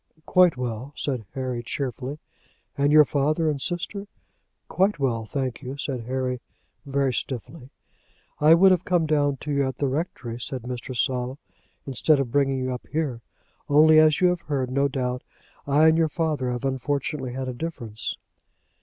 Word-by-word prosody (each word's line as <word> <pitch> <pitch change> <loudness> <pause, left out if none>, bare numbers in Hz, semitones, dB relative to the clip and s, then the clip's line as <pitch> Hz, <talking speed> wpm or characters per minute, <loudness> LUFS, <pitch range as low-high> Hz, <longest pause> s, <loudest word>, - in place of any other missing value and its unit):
"Quite 180 -6 +4
well," 125 +2 -4
said 125 -8 -3
Harry, 130 -2 -2
cheerfully. 130 +2 -4 0.6
"And 140 +1 +2
your 150 0 +8
father, 155 +4 +1
and 140 -2 -4
sister?" 195 +4 -3 0.6
"Quite 195 +2 +1
well, 120 -6 -1
thank 130 -2 -3
you," 135 +1 -6
said 130 -4 -4
Harry, 130 -1 -2 0.5
very 135 -1 +1
stiffly. 130 +3 -5 0.7
"I 155 +2 +7
would 190 +3 +6
have 180 -1 +2
come 175 -3 +2
down 145 -2 +1
to 150 - -4
you 140 -1 +1
at 130 - -5
the 145 - 0
rectory," 130 -5 -3
said 130 -1 -5
Mr. 125 0 -5
Saul, 125 +1 -1 0.5
"instead 140 +3 +2
of 130 -4 -2
bringing 135 -1 +2
you 130 0 -2
up 125 - -8
here; 150 -7 -2 0.5
only, 155 +2 +7
as 155 0 +4
you 180 - +6
have 180 -1 -1
heard, 135 -4 -2
no 140 +2 +2
doubt, 125 -2 -2 0.5
I 145 +3 +5
and 160 +1 +3
your 160 -1 +3
father 150 -5 -1
have 125 +1 -3
unfortunately 135 0 -2
had 130 0 -4
a 130 - -3
difference." 120 -7 -5
140 Hz, 170 wpm, -25 LUFS, 125-155 Hz, 0.7 s, your